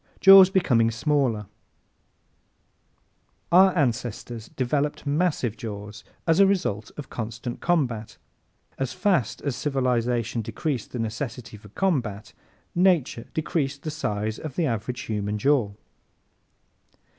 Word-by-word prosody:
Jaws 195 -1 +9
Becoming 125 -12 +3
Smaller 125 -2 0
¶ - - -11 2.1
Our 190 +2 +7
ancestors 120 -4 -2
developed 145 +4 -1
massive 145 - 0
jaws 105 -1 -8 0.2
as 165 +1 +3
a 195 - +7
result 110 - -1
of 150 - -8
constant 115 +1 -5
combat. 125 -11 -1 0.6
As 130 -2 -2
fast 185 - 0
as 140 -4 -1
civilization 125 -5 0
decreased 130 +2 -3
the - - -5
necessity 115 +1 -5
for 105 0 -14
combat 120 - -2 0.4
Nature 175 -10 +2
decreased 140 -3 -2
the 155 - -3
size 110 -8 -3
of 150 -4 -7
the 170 - +1
average 120 0 -3
human 105 -1 -3
jaw. 130 -3 +2
125 Hz, 115 wpm, -25 LUFS, 110-155 Hz, 2.1 s, Jaws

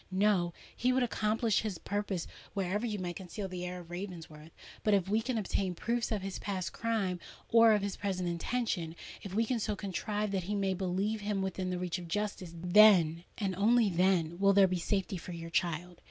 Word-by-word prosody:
"No—he 190 +4 +1
would 255 0 +2
accomplish 220 -2 +1
his 210 -5 -3
purpose, 200 -2 -2 0.3
wherever 200 +4 -1
you 210 -2 -2
might 175 -2 -4
conceal 190 +2 -6
the 180 -1 -5
heir 180 0 -5
of 170 0 -14
Ravensworth! 165 -4 -7 0.3
But 210 -1 +4
if 190 -2 +1
we 215 +3 +2
can 245 +1 -2
obtain 190 -3 -1
proofs 235 +5 -1
of 210 -3 -1
his 195 -1 -4
past 190 -3 -3
crime 210 -6 -1 0.3
or 230 -1 +7
of 205 -2 +1
his 200 -1 -3
present 185 -3 -2
intention—if 175 -1 -3
we 225 +2 +3
can 240 +1 0
so 210 -1 -1
contrive 205 +1 -2
that 185 -3 -2
we 210 - -1
may 195 -1 +1
place 190 +4 -1
him 205 -1 -1
within 190 -1 -2
the 180 - -1
reach 180 0 -2
of 175 - -8
justice,—then—and 180 0 +3
only 220 +2 +4
then 175 -1 +2
will 200 0 +5
there 195 -1 +6
be 185 -1 -1
safety 195 +1 -1
for 180 +1 -7
your 165 0 -7
child. 175 0 -1
195 Hz, 190 wpm, -32 LUFS, 180-210 Hz, 0.3 s, or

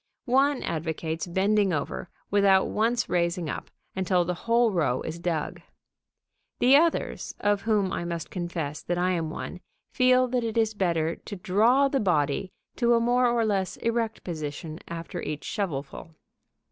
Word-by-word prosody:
One 270 +2 +2
advocates 160 +1 -3
bending 195 +2 +2
over, 160 +2 -3 0.2
without 195 -1 +4
once 230 +3 +1
raising 170 -2 0
up, - - -6 0.3
until 185 -2 +1
the 180 - -1
whole 230 +5 +2
row 150 -9 +1
is 160 +1 -5
dug. 165 -3 -2 1.0
The 255 +3 +5
others, 330 +3 +1
of 205 -1 +1
whom 210 -4 +1
I - - -2
must 170 -1 -4
confess 170 -5 -4
that 175 - -2
I 180 +1 +2
am 165 -3 -1
one, 180 - -6 0.3
feel 255 0 +4
that 245 -1 0
it 225 0 -3
is 220 -1 +2
better 170 -5 0
to 205 - -8
draw 225 +9 +3
the 275 0 0
body 175 - +1 0.3
to 235 -1 +4
a - - +4
more 245 +2 +3
or 235 -1 +2
less 195 -4 -1
erect 230 -1 -1
position 155 -1 -5
after 170 +2 -6
each 150 0 -4
shovelful. 160 -3 -4
190 Hz, 160 wpm, -27 LUFS, 170-230 Hz, 1.0 s, The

